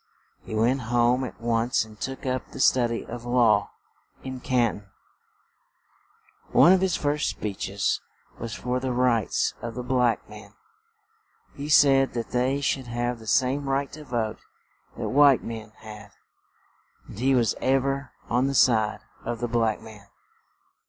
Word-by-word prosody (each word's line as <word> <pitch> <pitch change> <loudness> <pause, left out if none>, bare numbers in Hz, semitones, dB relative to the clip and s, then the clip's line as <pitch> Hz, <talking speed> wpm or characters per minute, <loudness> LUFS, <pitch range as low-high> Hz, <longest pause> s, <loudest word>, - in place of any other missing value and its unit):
He 110 - -6
went 120 +5 +2
home 120 +2 +2
at 125 - -7
once 115 0 0
and 110 -1 -16
took 135 +1 -5
up 130 -1 -2
the - - -10
stud 125 -2 +4
y 115 - -4
of 120 0 -7
law 120 -4 +3 0.5
in 130 -1 -6
Can 120 -4 0
ton; 100 -1 -22 1.6
one 175 - +7
of 190 - +3
his 190 -2 +1
first 150 0 0
speech 100 -3 -4
es 100 +1 0 0.4
was 115 0 -5
for 125 +1 -2
the 130 -1 -2
rights 120 -4 +1
of 115 -1 -6
the 125 - -4
black 125 -2 +1
men; 105 -1 -13 1.0
he 145 +1 -7
said 135 -3 +5
that 115 -1 -4
they 130 +3 0
should 135 -2 -1
have 120 0 -2
the 110 - -13
same 135 +4 +1
right 135 +1 -1
to 155 - -10
vote 115 -5 -3 0.6
that - - -3
white 140 -1 +5
men 110 -2 -7
had; 105 -1 -11 1.0
and 100 - -10
he 135 +2 +3
was 115 -4 +2
ev 135 0 +2
er 135 -1 -2 0.2
on 125 +3 +1
the 140 - -2
side 110 -5 +3 0.2
of 120 - -4
the 120 - -2
black 115 -2 0
man. 110 -2 -13
120 Hz, 165 wpm, -25 LUFS, 115-135 Hz, 1.6 s, one